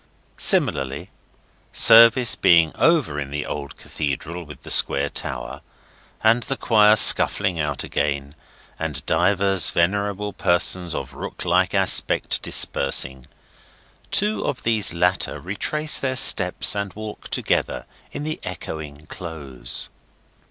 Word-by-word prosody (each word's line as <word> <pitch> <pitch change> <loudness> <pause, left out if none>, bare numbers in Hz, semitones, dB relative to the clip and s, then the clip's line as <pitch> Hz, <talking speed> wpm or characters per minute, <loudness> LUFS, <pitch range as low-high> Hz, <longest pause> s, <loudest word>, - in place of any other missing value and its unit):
Similarly, 70 +1 0 0.6
service 115 +2 +5
being 85 -2 +2
over 150 - 0
in 70 -2 -7
the 75 +1 -6
old 70 -1 -8
Cathedral 80 +4 -6
with 75 -3 -15
the - - -7
square 70 +1 +3
tower, - - -5 0.6
and 115 +2 +2
the 135 +2 -6
choir 105 -2 +3
scuffling 95 -3 +5
out 75 -1 -3
again, 70 -1 -4 0.5
and - - -6
divers 95 +2 +1
venerable 100 +3 -2
persons 90 -1 0
of - - -7
rook - - -9
like - - 0
aspect - - +2
dispersing, 65 -2 +1 0.8
two 210 +2 0
of 130 - -5
these 110 -3 +2
latter 90 +2 -2
retrace 150 - 0
their 130 -1 -3
steps, 100 -8 +4
and 100 -1 -5
walk 110 0 -10
together - - -2 0.3
in - - -8
the 155 +1 -6
echoing 80 -4 -9
Close. 70 -9 -5
90 Hz, 120 wpm, -20 LUFS, 75-110 Hz, 0.8 s, service